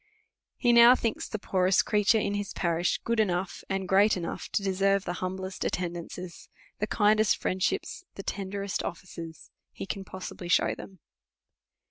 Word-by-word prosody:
He 240 -2 +3
now 235 +1 +9
thinks 230 -3 -2
the 215 - -3
poorest 190 -2 +2
creature 210 +1 +3
in 200 -1 0
his 205 -1 -3
parish 170 -1 0
good 230 -1 0
enougli, 185 -3 0
and 190 -1 -2
great 200 +2 +4
enough, 170 -2 -5
to 200 - +1
deserve 195 0 +1
the 175 - -2
humblest 185 0 -4
attendances, 175 0 -5 0.3
the 215 - -1
kindest 215 0 +3
friendships, 185 - -2
the 195 - -7
ten 195 -1 -4
derest 200 -1 -3
offices, 165 -1 -8 0.2
he - - -7
can 195 0 -4
possibly 185 -1 -8
shew 175 - +3
them. 190 -4 -12
195 Hz, 155 wpm, -28 LUFS, 180-205 Hz, 0.3 s, now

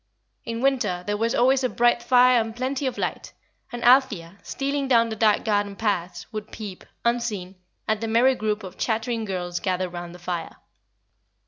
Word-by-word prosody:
In 230 0 -4
winter 240 -10 +1
there 205 - -1
was 230 +2 0
always 260 +2 +3
a 255 - +2
bright 240 0 +2
fire 250 0 +5
and 225 0 -5
plenty 260 +2 -2
of 255 - -3
light, - - -4 0.4
and 240 0 -6
Althea, 215 -9 +3
stealing 275 0 -2
down 230 -3 +4
the 220 - -4
dark 215 -1 +2
garden 205 -2 0
paths, 180 -5 -2
would 215 0 -6
peep, 205 -4 -8 0.2
unseen, 230 -6 -1 0.3
at 215 -1 0
the 225 - -2
merry 235 +4 +4
group 215 -3 -2
of 185 - -10
chattering 225 0 -1
girls 180 -3 -3
gathered 185 -1 -1
round 175 0 -7
the - - -10
fire. 175 -1 -5
220 Hz, 180 wpm, -24 LUFS, 190-245 Hz, 0.4 s, fire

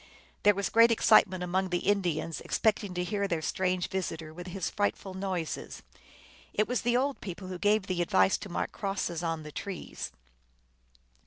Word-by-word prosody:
There 205 -1 +5
was 200 0 -1
a - - -18
great 230 +1 +7
ex 230 - +1
citement 190 -4 +6
among 185 +1 0
the 180 - +1
Indians, 175 -5 0
expecting 205 -4 0
to 180 - 0
hear 200 +2 -1
their 170 -4 -1
strange 185 0 0
visitor 165 -4 -4
with 175 +2 -8
his 185 0 -3
frightful 205 -2 -1
noises. 185 -4 -4 0.7
It 215 - +2
was 250 0 0
the 240 +1 +2
old 275 +2 0
people 185 -1 -6
who 180 -1 -5
gave 205 0 +3
the 185 -2 -1
advice 175 +2 +3
to 200 - -8
mark 175 - -2
crosses 195 -4 -2
on 165 -2 -2
the 150 - -8
trees. 190 +3 -6
190 Hz, 180 wpm, -30 LUFS, 175-205 Hz, 0.7 s, great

